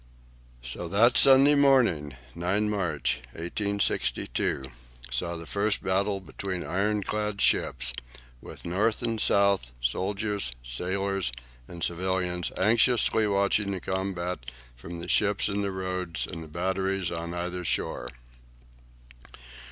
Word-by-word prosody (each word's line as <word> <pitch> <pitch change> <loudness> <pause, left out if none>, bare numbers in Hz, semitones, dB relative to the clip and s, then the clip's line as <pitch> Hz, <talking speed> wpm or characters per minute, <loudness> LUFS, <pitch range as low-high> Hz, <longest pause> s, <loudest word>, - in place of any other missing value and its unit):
So - - -3
that 110 +7 +4
Sunday 135 +1 +7
morning, 125 - +3 0.2
9 95 +5 0
March, 90 -10 -1
1862, 90 - -1 0.5
saw 85 +8 -1
the 85 0 -7
first 100 +5 0
battle 100 +1 +1
between 95 -1 -5
ironclad 105 +1 -1
ships, - - +2 0.5
with - - -11
North 105 +7 0
and 115 -2 -1
South, 100 -10 +3
soldiers, 100 - -1
sailors, 95 +6 -1 0.4
and 85 -1 -7
civilians 90 0 -1
anxiously 110 +1 +3
watching 100 0 +2
the 95 -2 -2
combat 95 -1 -3 0.4
from 85 +8 -8
the 85 - -6
ships 105 +1 +2
in 100 0 -1
the 100 - -1
Roads 95 -2 -2
and 85 -2 -7
the - - -10
batteries 95 +2 -1
on 85 0 -4
either 90 +1 -3
shore. - - -2
95 Hz, 115 wpm, -27 LUFS, 85-105 Hz, 0.5 s, Sunday